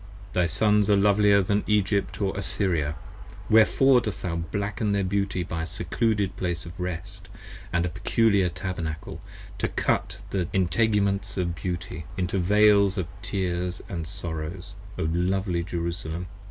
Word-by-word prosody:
Thy 90 -1 +2
Sons 105 +4 +3
are 105 - +6
lovelier 100 0 +4
than 100 +2 +1
Egypt 100 -1 +1
or 100 -2 0
Assyria: 85 -7 0 0.6
wherefore 125 +4 +6
Dost 105 -3 -5
thou 85 -2 -2
blacken 100 +5 -2
their 100 -1 +1
beauty 95 -1 -1
by 80 -1 -4
a - - -2
Secluded 100 +1 -1
place 90 -1 -3
of 85 +1 -10
rest, 95 +2 -5 0.4
And 85 0 +1
a - - -1
peculiar 100 +1 +2
Tabernacle, 85 -4 -5 0.4
to - - +1
cut - - -1
the 90 -4 0
integuments 100 +1 +1
of 90 -2 0
beauty 85 -2 -5
Into 90 +1 0
veils 100 +1 +4
of 95 - 0 0.2
tears 90 -2 -2
and 85 -4 -4
sorrows, 85 +4 -5 0.2
O - - -1
lovely 90 +2 0
Jerusalem! 85 -1 -4
95 Hz, 140 wpm, -26 LUFS, 85-100 Hz, 0.6 s, are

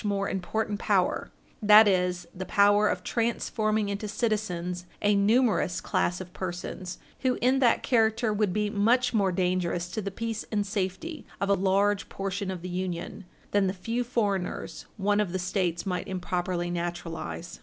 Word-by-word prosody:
418 210 - -1
more 195 0 -1
important 205 +2 -2
power 195 -5 +1 0.3
that 210 0 +8
is, 180 -2 +1
the 185 - -5
power 205 +2 +4
of - - -1
transforming 220 -2 0
into 200 +1 -3
citizens 185 -5 -2 0.2
a 205 0 +4
numerous 205 -3 +3
class 180 +1 0
of 185 -1 -9
persons 180 0 -5 0.2
who, 255 -2 +1
in 255 +2 +3
that 245 -3 +3
character, 225 -2 +2
would 210 -2 +1
be 210 +3 0
much 235 +5 +2
more 200 -4 +2
dangerous 180 -1 0
to 215 +4 -3
the 200 - -3
peace 225 +2 -4
and 205 -2 0
safety 200 - -3 0.2
of 200 - -1
a - - +5
large 200 +1 +2
portion 195 0 -3
of 185 -2 -5
the - - -4
Union 180 +2 -4 0.3
than 200 -1 +3
the 185 - -1
few 230 +6 -2
foreigners 205 -7 -2
one 205 +1 +2
of 205 -4 0
the - - +1
States 180 -1 -1
might 180 -2 -2
improperly 180 -1 -2
naturalize. 170 -1 -5
200 Hz, 165 wpm, -28 LUFS, 180-215 Hz, 0.3 s, that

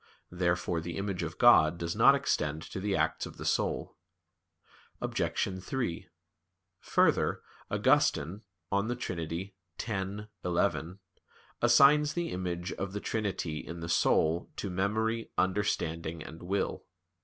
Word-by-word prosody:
Therefore 85 -1 0
the 85 0 -5
image 100 -2 -2
of - - -4
God 80 +2 +6
does 85 0 -3
not - - +7
extend 75 +1 -1
to - - -6
the 100 0 0
acts 80 0 0
of - - -12
the - - -7
soul. - - -1 1.0
Obj. 95 -1 -1
3: 115 -6 -3 0.7
Further, - - +2 0.3
Augustine 85 +9 +2 0.3
(De 100 +5 +1
Trin. 90 -3 -4 0.3
x, 100 -1 -3 0.2
11) 90 +1 0 0.6
assigns 145 +5 +6
the 175 -1 -2
image 90 -1 -3
of 100 0 -4
the 105 - -2
Trinity 100 -8 -2
in 85 +2 -7
the 85 - -4
soul 85 0 +2
to 100 - -4
"memory, 110 +5 0
understanding, 85 -5 -1
and 80 - -10
will." 95 +3 -2
95 Hz, 125 wpm, -30 LUFS, 85-105 Hz, 1.0 s, not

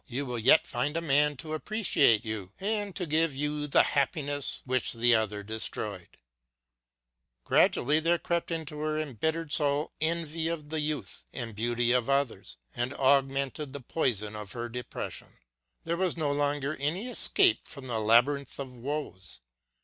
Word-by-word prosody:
you 135 +2 -3
will 125 -2 -4
yet 130 +8 +5
find 145 +6 -2
a - - +2
man 145 -2 +2
to 155 +3 -7
appreciate 155 - +2
you 105 -4 -5
and 205 -1 -2
to 180 - -2
give 155 -1 +1
you 150 +1 -2
the 140 - +5
happiness 145 0 0
which 130 -1 +1
the 120 +1 +3
other 105 -2 0
destroyed! 105 -3 -4 0.6
" - - -57
Gradually 150 +5 +3
there 170 +2 +2
crept 170 0 -2
into 160 -3 -4
her 155 0 -1
embittered 155 +3 -2
soul 145 0 +1
envy 160 0 0
of 160 -3 -4
the 160 0 -2
youth 150 -1 -3
and 120 -3 -5
beauty 120 +2 +1
of 125 0 +1
others 135 - -1 0.2
and 120 +3 -2
augmented 135 +1 +1
the 140 - -5
poison 115 -6 -1
of 105 -2 -7
her 120 0 -5
depression. 125 +1 -7 0.5
There 170 +1 -2
was 185 -1 0
no 150 -3 0
longer 145 0 -1
any 165 - -1
escape 350 +7 +4
from 140 -3 -7
this 120 -3 -2
labyrinth 125 +5 +3
of 135 -2 -6
woes 125 - -6
140 Hz, 160 wpm, -29 LUFS, 120-155 Hz, 0.6 s, yet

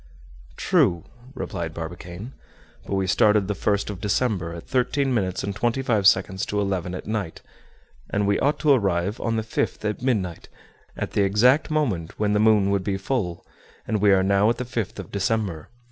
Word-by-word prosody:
"True," 85 -2 +2 0.3
replied 85 -9 -4
Barbicane. 90 +7 -7 0.5
"But 100 - -1
we 95 -1 +1
started 105 +2 +3
the 105 - 0
1st 100 +1 0
of 100 -2 -8
December, 100 -4 0
at 85 -1 -8
thirteen 130 +1 +1
minutes 95 -6 -1
and 100 -1 -3
twenty 120 +5 0
five 110 -6 +3
seconds 95 0 +3
to 105 - -1
eleven 95 -3 -2
at - - -7
night; 105 -6 -4 0.7
and 105 0 0
we 100 0 +2
ought 145 +2 +1
to 150 - +4
arrive 100 -5 +1
on 115 -1 0
the 110 - -1
5th 110 -1 -2
at 105 - -3
midnight, 100 -10 -1 0.5
at - - -3
the - - +1
exact 115 +11 +3
moment 115 - -1
when 105 -1 +1
the 105 - +2
moon 105 -2 +4
would 100 -2 +1
be 95 0 -1
full; 95 -5 -3 0.4
and 105 -2 0
we 105 -1 +5
are 95 -1 +4
now 100 +2 +3
at 120 - 0
the 125 - -4
5th 115 -5 -4
of 95 -4 -8
December. 100 -5 -1
100 Hz, 190 wpm, -24 LUFS, 95-110 Hz, 0.7 s, we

